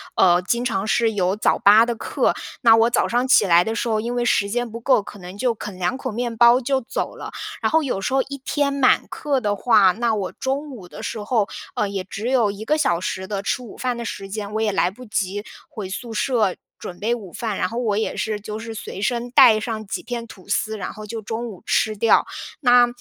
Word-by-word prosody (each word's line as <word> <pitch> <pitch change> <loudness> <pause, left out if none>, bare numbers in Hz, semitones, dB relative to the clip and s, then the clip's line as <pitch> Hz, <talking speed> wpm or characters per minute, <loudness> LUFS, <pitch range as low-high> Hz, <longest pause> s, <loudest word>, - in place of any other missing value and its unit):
呃， 180 -1 +5
经 235 +7 -1
常 195 -4 -1
是 225 0 +2
有 185 -2 +1
早 - - +2
8 215 +3 +7
的 235 -1 -2
课， - - 0 0.3
那 230 -3 +7
我 225 +1 +4
早 235 - +1
上 245 +2 +1
起 235 -5 +5
来 175 -2 +5
的 225 - -2
时 235 - -2
候， 215 -1 +1
因 240 +2 -3
为 240 - 0
时 200 -4 +2
间 245 +1 -2
不 230 +1 -8
够， 240 -4 +3
可 205 - -11
能 180 +2 -10
就 245 +1 +1
啃 200 -3 -8
两 180 +8 -1
口 - - -4
面 235 +1 -3
包 235 +2 +6
就 265 +1 0
走 235 - -4
了。 - - -8 0.3
然 - - +1
后 320 0 +4
有 220 -8 -2
时 260 - -2
候 270 - +4
一 280 0 -7
天 285 -1 0
满 275 -2 +3
课 285 -3 -1
的 205 -4 -1
话， 200 -4 +4
那 235 +2 0
我 200 -3 -2
中 280 +3 -3
午 200 -9 -11
的 - - -10
时 215 - -4
候， 215 -2 +1 0.3
呃， 210 - 0
也 195 -1 -4
只 200 +4 -6
有 235 -6 +3
1 210 +2 -8
个 305 - +2
小 175 - +1
时 185 +1 -4
的 200 -1 -3
吃 250 - -1
午 235 - -11
饭 250 -1 -1
的 235 - -4
时 195 -3 -6
间， 205 +1 -5
我 - - 0
也 215 -2 +1
来 180 - +2
不 250 +6 -12
及 205 -1 -2 0.2
回 210 -4 -6
宿 225 +4 -6
舍 220 -5 +1 0.2
准 175 - -8
备 225 +3 0
午 205 -7 -6
饭， 220 -4 -3
然 185 - 0
后 230 - -6
我 225 -4 0
也 220 - -2
是 215 -2 -2
就 210 +1 -6
是 225 +1 -7
随 210 -2 -7
身 240 +1 -1
带 240 -3 +7
上 220 -1 -4
几 195 - -4
片 235 -1 -5
吐 200 -4 -15
司， 215 +1 -1
然 - - -4
后 215 0 -9
就 225 +1 -6
中 225 +3 -4
午 195 -5 -10
吃 215 0 +1
掉。 225 +2 +4 0.4
那， 245 -2 +6
220 Hz, 265 characters per minute, -22 LUFS, 200-240 Hz, 0.4 s, 8